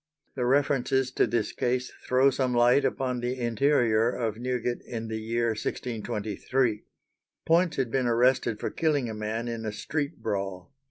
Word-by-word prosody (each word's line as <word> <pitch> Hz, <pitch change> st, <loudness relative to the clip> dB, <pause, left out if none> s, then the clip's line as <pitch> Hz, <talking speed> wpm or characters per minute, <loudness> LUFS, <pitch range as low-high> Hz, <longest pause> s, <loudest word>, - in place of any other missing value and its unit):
The 125 Hz, -2 st, -1 dB
references 135 Hz, -1 st, +2 dB
to -, -, +2 dB
this 115 Hz, -2 st, -1 dB
case 125 Hz, 0 st, -1 dB, 0.2 s
throw 130 Hz, +2 st, +4 dB
some 130 Hz, -1 st, 0 dB
light 120 Hz, +4 st, +5 dB
upon 125 Hz, -2 st, -1 dB
the 125 Hz, +2 st, -2 dB
interior 120 Hz, -2 st, +2 dB
of 115 Hz, -3 st, -2 dB
Newgate 125 Hz, -1 st, -2 dB
in 115 Hz, -1 st, -6 dB
the 110 Hz, 0 st, -3 dB
year 115 Hz, +1 st, 0 dB
1623. 110 Hz, +1 st, -2 dB, 0.6 s
Poyntz 170 Hz, +1 st, +3 dB
had 130 Hz, -4 st, -1 dB
been 130 Hz, -1 st, +1 dB
arrested 120 Hz, -1 st, +2 dB
for -, -, -3 dB
killing 145 Hz, -7 st, 0 dB
a -, -, -5 dB
man 110 Hz, +2 st, -3 dB
in 115 Hz, -1 st, -4 dB
a 110 Hz, -, -2 dB
street 145 Hz, +6 st, -3 dB
brawl. 95 Hz, +2 st, -3 dB
120 Hz, 160 wpm, -27 LUFS, 115-130 Hz, 0.6 s, light